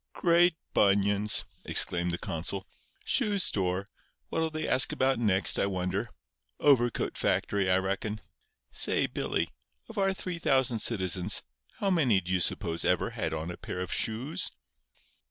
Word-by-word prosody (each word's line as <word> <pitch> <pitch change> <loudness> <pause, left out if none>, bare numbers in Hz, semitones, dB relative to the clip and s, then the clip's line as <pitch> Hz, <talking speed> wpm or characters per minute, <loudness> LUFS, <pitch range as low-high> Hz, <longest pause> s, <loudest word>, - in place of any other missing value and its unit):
"Great 175 0 +3 0.2
bunions!" 100 +1 +4 0.2
exclaimed 85 0 +3
the 85 - -3
consul. 90 +5 -3 0.4
"Shoe 215 -6 0
store! 95 - +1 0.4
What'll 160 0 -1
they 155 0 -4
ask 130 - +3
about 130 -1 0
next, 100 -4 +3
I - - +1
wonder? 90 -2 -3 0.5
Overcoat 120 -5 +2
factory, 100 -2 0
I 90 - +3
reckon. 100 +3 -3 0.5
Say, - - +1
Billy—of 225 -2 -5
our 195 0 +2
3,000 140 -10 0
citizens, 95 -3 +1 0.3
how 195 - -1
many 135 - +3
do 90 0 -7
you 95 - +1
suppose 85 -2 +2
ever 90 - 0
had 80 - -3
on 80 +2 -4
a 85 - -9
pair 90 - -7
of 90 -1 -4
shoes?" 120 +7 -1
105 Hz, 135 wpm, -28 LUFS, 90-140 Hz, 0.5 s, bunions